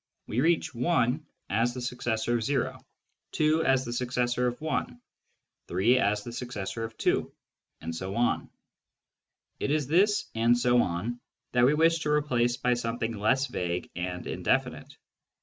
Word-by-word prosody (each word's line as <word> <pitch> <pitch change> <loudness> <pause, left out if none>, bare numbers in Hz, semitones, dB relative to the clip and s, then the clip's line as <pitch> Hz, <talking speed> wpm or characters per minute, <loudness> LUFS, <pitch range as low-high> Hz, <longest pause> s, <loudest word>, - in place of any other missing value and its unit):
We 120 - -1
reach 160 -2 +1
I, 125 0 +2 0.3
as 115 +4 +1
the - - -4
successor 120 -2 -1
of 115 0 -1
o; 135 -4 -1 0.5
2, 155 +1 +2
as 135 -2 +2
the 120 - -4
successor 125 0 0
of 125 +2 -3
1; 130 -5 -2 0.7
3, 110 +9 +3
as 105 -3 +1
the 120 - -7
successor 115 -2 -4
of 110 0 -7
2; - - +1 0.5
and 80 +1 -5
so 95 +3 -4
on. 120 0 +1 1.1
It - - -1
is 150 -1 +1
this 200 +8 +3
" - - -39
and 115 +2 +3
so 120 0 +4
on 100 +8 -2 0.2
" - - -57
that 125 0 +4
we 145 - +3
wish 165 +1 +4
to 150 - -2
replace 120 -5 +1
by 125 0 +2
something 115 -1 -2
less 130 +6 +2
vague 90 -8 -3
and 90 0 -4
indefinite. - - -1
120 Hz, 165 wpm, -28 LUFS, 115-135 Hz, 1.1 s, so